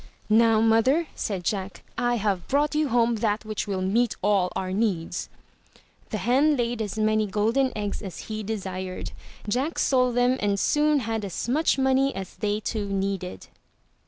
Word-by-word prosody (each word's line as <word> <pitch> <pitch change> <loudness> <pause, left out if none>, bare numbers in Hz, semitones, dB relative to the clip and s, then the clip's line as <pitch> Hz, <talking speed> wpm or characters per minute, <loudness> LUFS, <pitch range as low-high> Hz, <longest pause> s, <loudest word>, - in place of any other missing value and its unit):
"Now 225 0 +5
mother," 225 +9 +3
said 195 -4 -3
Jack, 195 +1 -3
"I 240 0 +1
have 200 -5 -1
brought 290 +2 +1
you 305 0 +1
home 235 -2 +2
that 215 0 -1
which 215 -1 -3
will 190 -2 -2
meet 225 +5 +1
all 195 -3 +2
our 185 -1 -2
needs." 190 -5 -1 0.8
The 215 - -2
hen 275 +7 +3
laid 240 -1 -1
as 210 0 -4
many 215 0 +2
golden 225 +6 +1
eggs 205 -1 -3
as 195 -4 -7
he 215 0 -4
desired. 190 -3 -5 0.4
Jack 260 +10 -1
sold 250 -2 +2
them 245 +1 +3
and 200 -1 0
soon 300 +3 +2
had 225 -2 -2
as 195 +2 -4
much 290 +4 +2
money 265 +1 +2
as 190 -1 -6
they 210 -1 -1
two 215 -1 -3
needed. 195 -2 -3
220 Hz, 165 wpm, -25 LUFS, 200-245 Hz, 0.8 s, Now